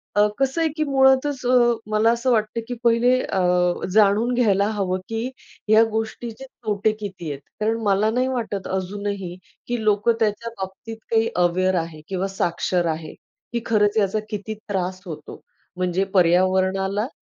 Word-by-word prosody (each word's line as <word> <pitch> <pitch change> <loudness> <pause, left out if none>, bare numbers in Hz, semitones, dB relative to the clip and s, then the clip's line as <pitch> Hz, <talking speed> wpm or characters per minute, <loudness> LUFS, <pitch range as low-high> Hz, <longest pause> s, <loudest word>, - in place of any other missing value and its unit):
अ, 210 0 +5
कसं 270 +5 +1
आहे 320 - +2
की 310 - +2
मुळातच 265 -1 +3
अ, - - +1 0.4
मला 220 +2 +4
असं 235 +2 0
वाटतं 220 0 0
की 245 - -3
पहिले 235 +1 +4
अ, 190 - -2 0.5
जाणून 215 +4 +4
घ्यायला 205 -5 +3
हवं 185 -1 0
की 225 +1 -2 0.4
ह्या 220 +1 +7
गोष्टीचे 225 +3 -4
तोटे 215 -4 -1
किती 185 -6 -6
आहेत, 140 - -6 0.2
कारण 220 +2 +1
मला 205 +1 +2
नाही 255 +2 +1
वाटत 225 -6 -3
अजूनही 190 -1 -3 0.3
की 240 -2 -2
लोकं 210 +2 +3
त्याच्या 220 +1 0
बाबतीत 190 +4 -7
काही 225 0 +3 0.2
अवेअर 185 +2 +1
आहे 155 -2 -10
किंवा 190 0 -2
साक्षर 175 -1 -1
आहे, 155 -1 -9 0.4
की 235 - 0
खरंच 210 -1 +2
याचा 210 0 +2
किती 210 +1 -4
त्रास 185 -2 -2
होतो, 155 -3 -8 0.4
म्हणजे 180 +1 0
पर्यावरणाला 190 +4 +2
210 Hz, 155 wpm, -22 LUFS, 190-230 Hz, 0.5 s, ह्या